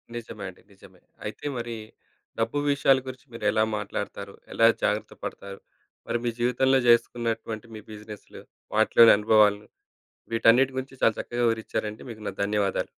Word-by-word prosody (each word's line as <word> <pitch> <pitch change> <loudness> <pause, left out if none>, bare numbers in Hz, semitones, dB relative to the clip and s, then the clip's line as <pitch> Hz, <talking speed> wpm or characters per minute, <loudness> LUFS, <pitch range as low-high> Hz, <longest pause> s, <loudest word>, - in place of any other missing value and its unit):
నిజమే 110 -3 -7
అండి. 90 - -16
నిజమే. 95 -2 -18 0.2
అయితే 105 +6 -7
మరి 120 0 -4 0.6
డబ్బు 115 +5 0
విషయాల 135 -1 +4
గురించి 130 +2 -8
మీరు 110 -2 -6
ఎలా 110 - +2
మాట్లాడతారు, 105 - -5 0.2
ఎలా - - +5 0.2
జాగ్రత్త - - 0
పడతారు, 100 0 -7 0.5
మరి 120 - 0
మీ 120 - +2
జీవితంలో 130 +2 +3
చేసుకున్నటువంటి 115 -1 +1
మీ 110 - -7
బిజినెస్‌లు 105 0 -11 0.3
వాటిలోని 115 -1 +7
అనుభవాల‌ను, 105 -1 +3 0.7
వీటన్నిటి 125 +4 +4
గురించి 130 0 -5
చాలా 115 - +4
చక్కగా 120 0 -2
వివరిచ్చారండి. 110 -1 -2
మీకు 110 -1 -10
నా - - -4
ధన్యవాదాలు. 100 -1 0
115 Hz, 140 wpm, -26 LUFS, 105-120 Hz, 0.7 s, వాటిలోని